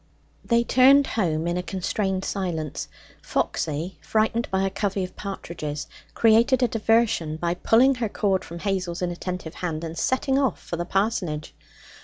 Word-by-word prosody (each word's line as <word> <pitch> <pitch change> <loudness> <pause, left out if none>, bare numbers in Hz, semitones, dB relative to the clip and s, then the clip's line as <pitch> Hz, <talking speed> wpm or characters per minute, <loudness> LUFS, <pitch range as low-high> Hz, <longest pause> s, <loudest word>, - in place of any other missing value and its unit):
They 235 0 +2
turned 270 +3 +6
home 165 -10 -1
in 175 +1 0
a - - 0
constrained 190 +1 -2
silence. 170 -6 -3 0.3
Foxy, 160 +4 -2
frightened 220 +2 0
by 190 0 +1
a 195 - -1
covey 195 -2 -1
of 185 0 -7
partridges, 165 -7 -5 0.3
created 230 +3 +4
a - - +5
diversion 225 -8 +1
by 170 +1 0
pulling 235 +9 +4
her 225 - 0
cord 195 -2 0
from 170 - -8
Hazel's 180 -2 -2
inattentive 175 -1 -4
hand 165 -3 -4
and 165 0 -5
setting 265 +7 +1
off 265 -8 +1
for - - -5
the 175 +1 -3
parsonage. 185 -6 -1
190 Hz, 155 wpm, -24 LUFS, 170-225 Hz, 0.3 s, turned